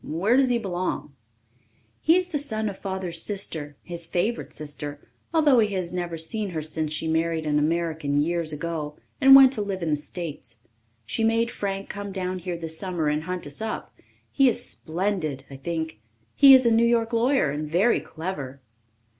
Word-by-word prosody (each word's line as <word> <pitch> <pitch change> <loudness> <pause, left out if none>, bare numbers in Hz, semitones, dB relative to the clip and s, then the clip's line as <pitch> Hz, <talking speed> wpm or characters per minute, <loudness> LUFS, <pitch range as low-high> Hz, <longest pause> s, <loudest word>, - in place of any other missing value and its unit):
"Where 185 +10 +1
does 265 -1 +4
he 245 - +2
belong?" 185 -8 -3 0.9
"He 325 - +4
is 365 0 +1
the 300 -5 -1
son 220 -6 -2
of 195 - -8
Father's 190 -4 -4
sister 160 -8 -3
his 170 -1 -4
favourite 205 +8 -1
sister, 145 -1 -6 0.3
although 300 -6 +4
he 210 -3 +1
has 180 -2 -3
never 175 -2 -3
seen 205 +6 -2
her 160 -3 -3
since 155 0 -2
she 155 +1 -2
married 160 0 0
an 150 -1 +2
American 160 -2 0
years 165 +1 +2
ago 150 -1 -4 0.2
and 270 0 +9
went 270 -1 +8
to 220 - -2
live 195 -3 -3
in 160 - -1
the - - +3
States. 155 +1 -7 0.5
She 120 - -1
made 230 +1 +2
Frank 195 -1 -4
come 200 0 -6
down 185 -1 -3
here 175 -1 -4
this 160 -1 -5
summer 175 -6 -1
and 150 +1 -1
hunt 180 0 -4
us 145 +5 -6
up. 220 0 -4 0.4
He 270 -2 +4
is 245 +1 -1
splendid, 165 -5 -2
I - - -7
think. 160 -3 -4 0.3
He 275 -1 +9
is 260 -1 +4
a 235 - +4
New 225 +1 +4
York 230 0 +1
lawyer 235 - +2
and 150 +1 -4
very 190 +9 +3
clever." 145 -6 -6
175 Hz, 190 wpm, -25 LUFS, 155-220 Hz, 0.9 s, and